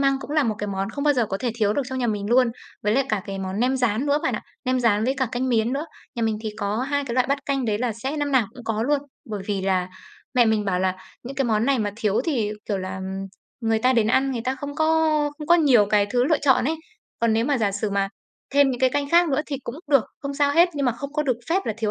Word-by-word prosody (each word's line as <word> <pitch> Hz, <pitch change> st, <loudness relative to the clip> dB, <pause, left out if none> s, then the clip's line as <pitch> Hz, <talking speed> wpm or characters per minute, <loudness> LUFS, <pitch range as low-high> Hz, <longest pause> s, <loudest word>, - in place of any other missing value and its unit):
măng 275 Hz, -1 st, +2 dB
cũng 285 Hz, -, -9 dB
là 305 Hz, -1 st, +3 dB
một 220 Hz, -, 0 dB
cái 210 Hz, -, -3 dB
món 195 Hz, +1 st, -3 dB
không 285 Hz, +4 st, -4 dB
bao 290 Hz, -1 st, +4 dB
giờ 240 Hz, -3 st, +1 dB
có 195 Hz, -, -2 dB
thể 245 Hz, -, 0 dB
thiếu 215 Hz, -3 st, +1 dB
được 280 Hz, -, 0 dB
trong 260 Hz, 0 st, -3 dB
nhà 245 Hz, -, 0 dB
mình 205 Hz, -2 st, -2 dB
luôn. 250 Hz, 0 st, +5 dB, 0.3 s
Với 210 Hz, +2 st, +1 dB
lại 275 Hz, -, +3 dB
cả 210 Hz, -4 st, 0 dB
cái 195 Hz, -1 st, -5 dB
món 190 Hz, +2 st, -3 dB
nem 255 Hz, +2 st, +2 dB
rán 245 Hz, +1 st, 0 dB
nữa 285 Hz, +1 st, +3 dB
bạn -, -, 0 dB
ạ, -, -, -4 dB, 0.2 s
nem 255 Hz, 0 st, +1 dB
rán 215 Hz, -2 st, +2 dB
với 265 Hz, +3 st, +1 dB
cả 260 Hz, -, +1 dB
canh 255 Hz, +1 st, -1 dB
miến 230 Hz, 0 st, +1 dB
nữa. 285 Hz, +4 st, -2 dB, 0.3 s
Nhà 235 Hz, -, -3 dB
mình 220 Hz, -1 st, 0 dB
thì 220 Hz, -, -3 dB
có 205 Hz, 0 st, -1 dB
2 285 Hz, +2 st, -1 dB
cái 240 Hz, -3 st, -4 dB
loại 255 Hz, 0 st, +2 dB
bát 280 Hz, 0 st, +1 dB
canh 275 Hz, -2 st, 0 dB
đấy 215 Hz, -2 st, 0 dB
là 245 Hz, -2 st, -1 dB
sẽ 265 Hz, +7 st, -4 dB
năm 290 Hz, -1 st, -1 dB
nào 255 Hz, -5 st, +4 dB
cũng 245 Hz, -2 st, -11 dB
có 220 Hz, -1 st, -1 dB
luôn, 285 Hz, +3 st, +1 dB, 0.3 s
bởi 205 Hz, -2 st, -4 dB
vì 200 Hz, -2 st, -1 dB
là 185 Hz, -1 st, +1 dB, 0.5 s
mẹ 245 Hz, -1 st, +5 dB
mình 220 Hz, -1 st, +2 dB
bảo 185 Hz, -3 st, 0 dB
là 185 Hz, 0 st, 0 dB, 0.3 s
những 265 Hz, +2 st, -8 dB
cái 270 Hz, -, +1 dB
món 220 Hz, -1 st, +1 dB
này 275 Hz, -3 st, +3 dB
mà 205 Hz, -2 st, -1 dB
thiếu 215 Hz, -2 st, +1 dB
thì, 240 Hz, -11 st, 0 dB, 0.2 s
kiểu 205 Hz, -3 st, 0 dB
là, 185 Hz, 0 st, -5 dB, 0.6 s
người 225 Hz, -1 st, +1 dB
ta 255 Hz, +3 st, +3 dB
đến 230 Hz, -3 st, +3 dB
ăn, 270 Hz, +3 st, +2 dB
người 235 Hz, -3 st, -3 dB
ta 260 Hz, -, 0 dB
không 285 Hz, +1 st, -6 dB
có 315 Hz, -, +1 dB, 0.5 s
không 300 Hz, -, -6 dB
có 345 Hz, -, +6 dB
nhiều 270 Hz, -11 st, +5 dB
cái 205 Hz, 0 st, +3 dB
thứ 245 Hz, 0 st, +2 dB
lựa 305 Hz, +2 st, +2 dB
chọn 265 Hz, -4 st, +4 dB
ấy. 315 Hz, +5 st, 0 dB, 0.4 s
Còn 230 Hz, -1 st, +3 dB
nếu 225 Hz, +1 st, +2 dB
mà 280 Hz, -1 st, +1 dB
giả 205 Hz, -3 st, +1 dB
sử 205 Hz, +1 st, -2 dB
mà 200 Hz, 0 st, 0 dB, 0.5 s
thêm 280 Hz, -1 st, +5 dB
những 250 Hz, 0 st, -4 dB
cái 260 Hz, -, +4 dB
canh 285 Hz, +1 st, -1 dB
khác 345 Hz, 0 st, +5 dB
nữa 280 Hz, 0 st, +1 dB
thì 285 Hz, -, -3 dB
cũng 235 Hz, -, -5 dB, 0.2 s
được, 275 Hz, -5 st, +5 dB, 0.2 s
không 280 Hz, 0 st, -4 dB
sao 285 Hz, 0 st, +2 dB
hết, 340 Hz, +3 st, +5 dB
nhưng 280 Hz, -3 st, 0 dB
mà 245 Hz, -, +2 dB
không 280 Hz, +4 st, -7 dB
có 300 Hz, 0 st, 0 dB
được 255 Hz, -5 st, 0 dB
phép 385 Hz, +3 st, +2 dB
là 220 Hz, -, 0 dB
thiếu 220 Hz, -2 st, 0 dB
245 Hz, 300 wpm, -23 LUFS, 215-275 Hz, 0.6 s, có